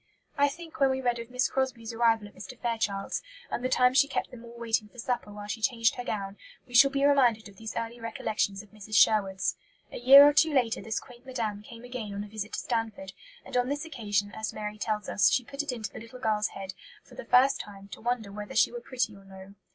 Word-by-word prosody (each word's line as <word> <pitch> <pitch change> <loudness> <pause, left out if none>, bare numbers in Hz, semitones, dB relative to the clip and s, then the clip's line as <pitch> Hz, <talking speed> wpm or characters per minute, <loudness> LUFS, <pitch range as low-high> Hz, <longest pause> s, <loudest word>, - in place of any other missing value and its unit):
I 285 -1 +4
think 325 +3 -8
when 275 -1 +5
we 265 0 0
read 245 -2 0
of 230 0 -7
Miss 250 0 +1
Crosbie's 245 -4 -2
arrival 225 -2 +2
at 205 - -17
Mr. 255 +3 -10
Fairchild's, 220 -4 -2 0.3
and 245 - -3
the 255 - 0
time 250 0 +4
she 280 +1 +5
kept 280 - -3
them 235 -2 -11
all 235 0 -12
waiting 225 -2 0
for 245 - -21
supper 245 -3 -3
while 205 0 -8
she 210 +2 -5
changed 230 -1 +2
her 245 - -5
gown, 200 -4 -4 0.3
we 245 - -16
shall 275 +3 +8
be 275 0 +1
reminded 245 -6 +3
of 200 -1 -16
these 220 +1 -7
early 230 +1 -4
recollections 215 -3 -2
of 210 - -20
Mrs. 215 0 -7
Sherwood's. 195 -4 +3 0.3
A - - -6
year 275 +4 +10
or 290 - +4
two 315 0 +3
later 240 -4 +2
this 220 0 -2
quaint 245 -1 -15
Madame 230 -6 -3
came 230 +2 -12
again 245 -5 -6
on 200 - -3
a - - -9
visit 210 0 -6
to - - -2
Stanford; 220 -5 -3 0.3
and - - -8
on 250 +1 +2
this 290 +3 -2
occasion, 205 -9 -1
as 220 0 -4
Mary 210 0 -6
tells 210 -1 -2
us, 190 - +4
she 250 - +1
put 275 +2 -4
it 295 - -3
into 220 -5 -5
the - - -9
little 230 +3 -11
girl's 215 -3 +1
head, 190 -1 -7 0.3
for - - -19
the - - -8
first 265 +2 +4
time, 200 -1 -12
to - - -10
wonder 235 -3 -2
whether 205 0 -7
she - - +4
were 480 - -6
pretty 245 - -2
or 195 - -15
no. 190 0 -13
230 Hz, 245 wpm, -28 LUFS, 210-255 Hz, 0.3 s, year